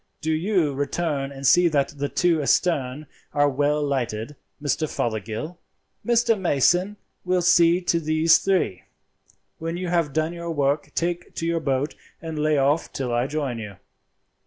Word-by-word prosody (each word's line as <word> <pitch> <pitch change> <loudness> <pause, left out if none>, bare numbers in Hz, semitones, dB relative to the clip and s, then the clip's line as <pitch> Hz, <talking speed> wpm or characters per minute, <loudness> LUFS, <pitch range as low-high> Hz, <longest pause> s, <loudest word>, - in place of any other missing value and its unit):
Do 160 0 -2
you 165 -2 +1
return 140 0 -2
and 135 0 -7
see 175 +7 +6
that 145 -4 +1
the 145 -1 -4
two 170 -3 +2
astern 145 -2 0 0.3
are 145 -1 +3
well 145 +2 +1
lighted, 125 -2 -2 0.2
Mr. 150 +1 -1
Fothergill; 115 - -3 0.4
Mr. 235 -2 +2
Mason 180 +5 +2 0.3
will 180 -1 +1
see 175 0 +5
to 170 -1 +1
these 155 +1 +4
three. 185 - 0 0.7
When 165 +1 -3
you 180 -1 -3
have 170 -4 +1
done 155 +3 -1
your 170 0 -6
work 145 -1 0
take 175 0 -2
to 165 - -3
your 170 0 0
boat 140 -1 -1 0.3
and 160 -2 -6
lay 155 0 +2
off 140 +4 +1
till 125 -3 -3
I 120 +2 +1
join 140 -5 -3
you. 105 -3 -7
155 Hz, 160 wpm, -24 LUFS, 140-170 Hz, 0.7 s, see